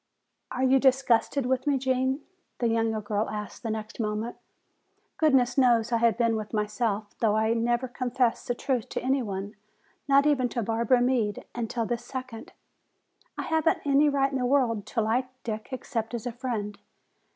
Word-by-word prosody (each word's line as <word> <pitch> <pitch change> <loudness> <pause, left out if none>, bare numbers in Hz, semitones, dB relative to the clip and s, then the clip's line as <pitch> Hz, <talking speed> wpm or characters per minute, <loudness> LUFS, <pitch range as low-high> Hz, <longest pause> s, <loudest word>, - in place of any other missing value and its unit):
"Are 255 - -2
you 265 +1 +5
disgusted 260 0 +2
with 260 +2 0
me, 285 -2 +3
Gene?" 260 +1 0 0.4
the 240 - +1
younger 225 -1 0
girl 210 +1 -1
asked 210 -1 -6
the 230 - -4
next 215 +1 -5
moment. 215 +1 -2 0.8
"Goodness 265 -5 +3
knows, 235 -3 +3
I 235 - +3
have 230 -2 +3
been 230 -2 +2
with 215 0 -5
myself, 210 0 -1
though 215 -2 +2
I 220 +1 +2
never 240 +2 0
confessed 245 -1 -1
the 245 - 0
truth 250 -3 -2
to - - -3
any 265 +1 +2
one, 200 -2 -4 0.5
not 280 0 +5
even 265 -4 +2
to 235 - -2
Barbara 230 +3 +2
Meade, 240 -5 0
until 230 -1 -2
this 240 +1 -3
second. 255 -4 -7 0.9
I - - -2
haven't 320 0 +1
any 285 +1 +4
right 275 -1 +1
in 270 - -1
the 250 - 0
world 245 -6 +1
to 230 - -1
like 235 +4 +1 0.2
Dick 215 -2 -5
except 240 -2 -3
as 230 - -5
a 245 - -2
friend. 225 -4 -4
240 Hz, 175 wpm, -27 LUFS, 220-260 Hz, 0.9 s, you